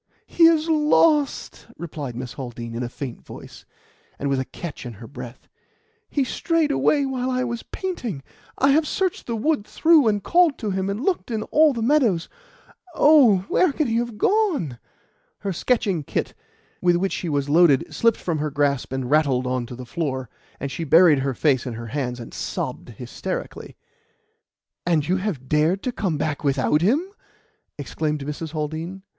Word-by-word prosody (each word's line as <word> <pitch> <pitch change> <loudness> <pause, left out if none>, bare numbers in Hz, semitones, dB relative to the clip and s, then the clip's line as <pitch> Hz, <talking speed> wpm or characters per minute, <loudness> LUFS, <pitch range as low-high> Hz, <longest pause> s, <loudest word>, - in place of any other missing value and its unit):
"He 335 - +4
is 325 -1 +3
lost!" 300 -2 +2
replied 150 -7 -6
Miss 125 0 -6
Haldean 120 -3 -7
in 115 - -4
a 120 - -3
faint 125 -1 -7
voice, - - -12 0.5
and 140 - -2
with 135 - +1
a 130 - -2
catch 150 +5 -8
in 120 -2 -7
her 115 +3 -11
breath. 125 -1 -10 0.6
"He 285 - +1
strayed 320 +3 0
away 285 0 +2
while 260 -1 -2
I 255 0 0
was 235 -2 -3
painting. 245 - -5 0.3
I 275 +1 +4
have 305 +2 +3
searched 375 -3 -2
the 235 - -2
wood 285 +1 0
through, 315 +3 +4
and 205 -2 +1
called 345 -4 +3
to 215 -4 -3
him, 190 +1 -1
and 205 +6 -3
looked 380 -8 0
in 220 -2 -2
all 310 0 +5
the 235 -4 -3
meadows. 230 - +2 0.7
Oh! 250 -11 +5
where 365 - +3
can 305 +2 -1
he 230 -2 0
have 235 -2 -2
gone?" 320 - +1 0.6
Her 195 -2 -2
sketching 195 -3 0
"kit," - - -3 0.5
with 175 -1 +3
which 190 +2 0
she 175 - -3
was 145 -2 -1
loaded, 150 -2 +4
slipped 230 -1 +2
from 165 -4 -2
her 150 +1 -1
grasp 140 -2 0
and 130 -1 -3
rattled 140 -4 +2
on 125 -1 -2
to 125 - -8
the 125 +1 -8
floor, 130 -4 -3 0.3
and 140 0 -4
she 150 +6 -4
buried 160 -1 +6
her 135 -1 -2
face 130 -4 +1
in 125 - -4
her 115 +1 -7
hands 125 -4 -2
and 115 - -9
sobbed - - -4
hysterically. - - -6 1.1
"And 160 -4 +1
you 185 +2 +2
have 185 -10 -4
dared 155 +7 +1
to 250 - -1
come 185 -9 -2
back 150 -1 -2
without 140 +2 +2
him?" 270 - +2 0.7
exclaimed 150 +1 -3
Mrs. 150 +2 -5
Haldean. 160 +5 -4
175 Hz, 180 wpm, -23 LUFS, -, 1.1 s, buried